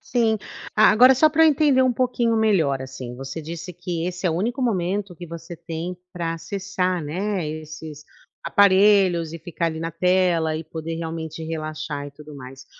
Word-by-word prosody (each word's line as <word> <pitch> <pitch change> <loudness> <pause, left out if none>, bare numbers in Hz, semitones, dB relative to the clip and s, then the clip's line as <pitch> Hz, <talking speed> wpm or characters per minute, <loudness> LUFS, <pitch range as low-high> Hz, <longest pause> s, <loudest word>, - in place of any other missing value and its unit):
Sim, 230 -3 +1 0.4
agora 220 +5 +7
só 310 +4 +5
pra 320 +1 +5
eu - - +7
entender 285 -3 +4
um 255 -1 +3
pouquinho 240 -2 +1
melhor 170 -12 +2
assim, 130 -2 -8
você 135 +4 -6
disse 165 +3 -7
que 175 -1 -4
esse 180 +1 -3
é - - +2
o - - -1
único 240 +8 -1
momento 195 -3 -1
que 175 - -8
você 170 +1 -8
tem 170 +2 -5 0.2
pra 165 -2 -3
acessar, 185 -1 -2
né, 180 +3 -2
esses 155 -1 -8 0.4
aparelhos 190 -4 +4
e 165 - -6
ficar 170 +1 -3
ali 160 0 -3
na 165 0 -3
tela 175 -2 +2
e 160 - -4
poder 160 +1 -6
realmente 160 -1 -5
relaxar 155 -2 -4
e - - -9
tudo 150 +1 -13
mais. 135 0 -11
170 Hz, 180 wpm, -23 LUFS, 160-200 Hz, 0.4 s, agora